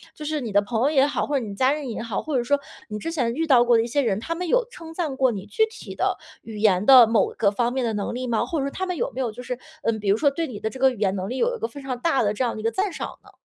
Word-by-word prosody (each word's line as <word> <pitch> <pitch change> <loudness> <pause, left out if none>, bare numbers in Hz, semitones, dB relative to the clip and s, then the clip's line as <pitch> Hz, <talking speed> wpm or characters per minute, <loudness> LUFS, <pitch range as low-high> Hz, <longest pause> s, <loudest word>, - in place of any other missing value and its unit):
就 305 - -9
是 305 -1 -2
你 230 -4 -4
的 205 +1 +4
朋 225 +2 -2
友 280 - +3
也 275 -2 +4
好， 290 - -1
或 290 - -2
者 230 - -5
你 200 - -6
家 260 +5 +3
人 290 -4 -3
也 225 - -4
好， 230 -3 -3
或 310 -3 -3
者 240 - +1
是 - - -12
说 285 +1 +3 0.3
你 210 - -4
之 330 - -4
前 245 -7 0
遇 325 +4 -1
到 255 -5 +6
过 240 -1 +4
的 225 - +3
一 - - -4
些 285 +4 +1
人， 215 -6 0
他 330 +9 -3
们 360 +1 -4
有 - - +2
称 330 -8 -11
赞 320 -6 -2
过 260 -2 +3
你 200 -2 -6
具 325 - +2
体 450 - -10
的 - - 0 0.2
语 220 -2 -9
言 200 -2 +3
的 255 -2 +9
某 225 -2 +2
个 200 - +3
方 240 +3 0
面 260 -2 0
的 225 - -1
能 205 -1 -3
力 250 +1 -4
吗？ 230 -2 +1
或 325 - -2
者 275 - -1
说 280 - -3
他 375 - -3
们 360 -1 -3
有 - - -1
没 265 - -3
有 235 -3 -1
就 245 - -9
是， 250 0 -4 0.3
嗯， 220 -1 0
比 205 - -6
如 205 - +4
说 285 - +3
对 325 +3 -2
你 215 -7 -7
的 220 - -2
这 260 - -10
个 265 0 +5
语 250 - -9
言 195 -2 +1
能 190 +1 -4
力 255 - -3
有 - - +1
一 - - -9
个 - - -1
非 280 +4 -10
常 260 -2 -4
大 275 -4 +2
的 205 0 +1
这 255 - -1
样 240 - 0
的 - - -7
一 - - -7
个 225 - +1
赞 390 +1 -1
赏 - - -6
呢？ - - -18
250 Hz, 395 characters per minute, -24 LUFS, 220-295 Hz, 0.3 s, 的